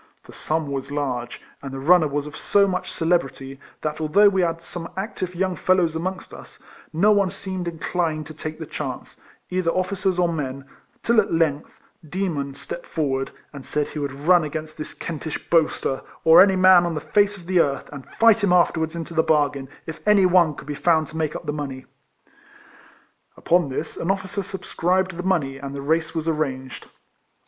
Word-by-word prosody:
The - - -14
sum 155 -2 -2
was 135 0 -4
large, 130 -4 -3 0.2
and 135 - -7
the 135 - -6
runner 160 +3 +5
was 145 0 -2
of 150 - -9
so 200 -1 +3
much 185 -1 -3
celebrity, 135 -5 -1 0.2
that 155 +1 -3
al 155 - 0
though 205 +6 +6
we 190 -1 +1
had 165 -1 0
some 170 -1 -7
active 190 -3 -4
young 185 +1 0
fellows 180 -3 +2
amongst 185 +3 -4
us, - - -12 0.3
no 190 +7 +3
one 200 -2 +3
seemed 185 -1 -5
inclined 165 -1 -2
to 155 - -9
take 155 0 -6
the 160 - -6
chance, - - -6 0.3
either 180 -2 0
officers 185 +1 0
or 180 -1 +3
men, 140 -3 -4 0.4
till 235 -1 +4
at 200 - -6
length 160 -3 0 0.3
Demon 150 -7 -2
stepped - - -7
forth 135 -4 -1 0.2
and 140 -2 -9
said 150 +1 -2
he 155 - -6
would 140 -1 -2
run 175 -1 +6
against 155 +1 -5
this 155 - -6
Kentish 160 -1 -6
boaster, 155 -5 +1 0.2
or 165 +2 +8
any 195 0 +5
man 185 -1 +7
on 170 -2 -2
the - - -1
face 205 +3 +2
of 175 - -13
the 185 0 +2
earth, 140 -4 +1
and 140 -2 -9
fight 225 -1 +5
him 200 - +3
afterwards 160 -2 +2
into 165 0 -6
the 160 - +4
bargain, 145 -4 +1 0.2
if 160 -1 -7
any 205 -2 +6
one 175 -4 +4
could - - -10
be 150 - -4
found 160 0 +2
to - - -11
make 155 -1 -1
up - - -6
the 150 - -2
money. 135 -3 -5 1.5
Upon 175 -4 +2
this, 145 +4 -4
an 165 - -3
officer 195 +1 -1
subscribed 185 -1 -1
the - - -3
money, 165 -8 0
and 140 0 -6
the 140 - -5
race 160 +2 0
was 160 0 -2
arranged. 135 -5 -3
165 Hz, 195 wpm, -23 LUFS, 145-185 Hz, 1.5 s, or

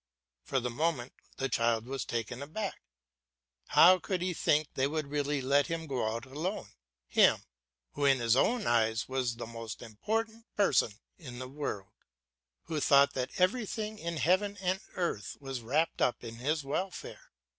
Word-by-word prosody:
For 100 - -1
the 125 0 -3
moment 140 -2 -1 0.2
the 135 - 0
child 115 -2 +1
was 135 +1 -4
taken 120 +2 -3
aback. 190 +8 -4 0.9
How 185 +2 +7
could 180 +1 -2
he 180 0 0
think 155 -2 +2
they 135 +1 +1
would 155 +1 -2
really 145 -1 0
let 140 +2 +3
him 165 -1 -3
go 125 -7 -1
out 115 +1 -4
alone, 150 - -4 0.4
him, - - +4 0.5
who, 145 - -1
in 135 -1 +5
his 120 -1 +3
own 230 - +2
eyes, 115 -1 +2
was 130 -3 -1
the 120 - -6
most 115 0 -7
important 220 - -3
person 140 - +3 0.3
in 130 -7 -9
the 130 +1 -5
world, 130 -8 -5 0.7
who 155 - -3
thought 140 0 +5
that 130 +5 -3
everything 215 +2 0
in 170 0 -3
heaven 185 +7 +2
and 185 +1 0
earth 170 - -2
was 135 -3 -5
wrapped 145 +8 0
up 125 - +1
in 115 -1 -7
his 150 +5 -1
welfare? 180 +7 -4
140 Hz, 165 wpm, -31 LUFS, 120-175 Hz, 0.9 s, How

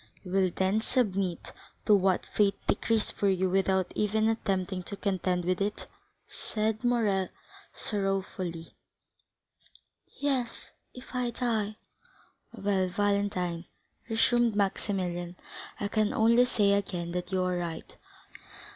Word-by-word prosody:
'" - - -29
"You 180 - -8
will 190 -1 +3
then 190 +4 +1
submit 195 -8 -1 0.3
to 210 - +5
what 190 -2 +3
fate 200 -2 +2
decrees 225 -2 +1
for 200 - +1
you 190 -1 +1
without 190 -1 +2
even 215 +1 +2
attempting 190 -4 -1
to 200 +3 -7
contend 185 -3 0
with 185 +1 0
it?" 205 +1 -2 0.4
said 220 +1 -2
Morrel 215 -6 +2 0.4
sorrowfully. 190 -4 -3 1.4
"Yes,—if 255 -1 -4
I 250 -1 0
die!" 225 -3 -1 0.8
"Well, 195 -2 0
Valentine," 185 -3 0 0.4
resumed 230 0 +3
Maximilian, 185 -3 -1 0.4
"I 205 - -1
can 215 0 +1
only 235 +2 +5
say 205 -5 +3
again 180 -4 -1
that 180 +1 -4
you 185 -1 +1
are 180 -1 0
right. 170 -2 -5
200 Hz, 120 wpm, -29 LUFS, 185-220 Hz, 1.4 s, to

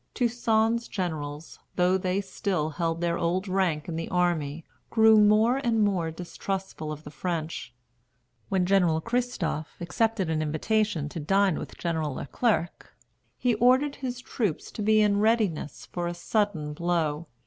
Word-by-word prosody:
Toussaint's 235 -1 +1
generals, 155 -5 -4 0.2
though 180 +1 +3
they 185 +1 0
still 190 -5 -2
held 165 +2 -2
their 170 -1 0
old 180 +4 0
rank 185 -5 0
in 165 -2 -4
the 165 - -4
army, 165 -4 0 0.2
grew 220 -1 +6
more 215 +4 +5
and 235 -5 +1
more 185 -5 +1
distrustful 180 -1 -5
of 155 0 -7
the 150 - -9
French. 160 -6 -4 0.8
When 185 -2 +2
General 180 -4 +3
Christophe 230 -8 -2
accepted 195 +3 0
an 160 -1 0
invitation 160 +2 0
to 165 - -6
dine 195 +3 +2
with - - -8
General 160 -5 -2
Le - - -5
Clerc, 205 - -1 0.4
he 245 -1 +2
ordered 255 +6 +3
his 250 -2 -4
troops 210 - -2
to - - -6
be 215 +1 +4
in 205 -1 +3
readiness 210 - 0
for 175 -1 -4
a 175 - -3
sudden 175 -5 -1
blow. 165 -1 -1
180 Hz, 150 wpm, -27 LUFS, 160-215 Hz, 0.8 s, grew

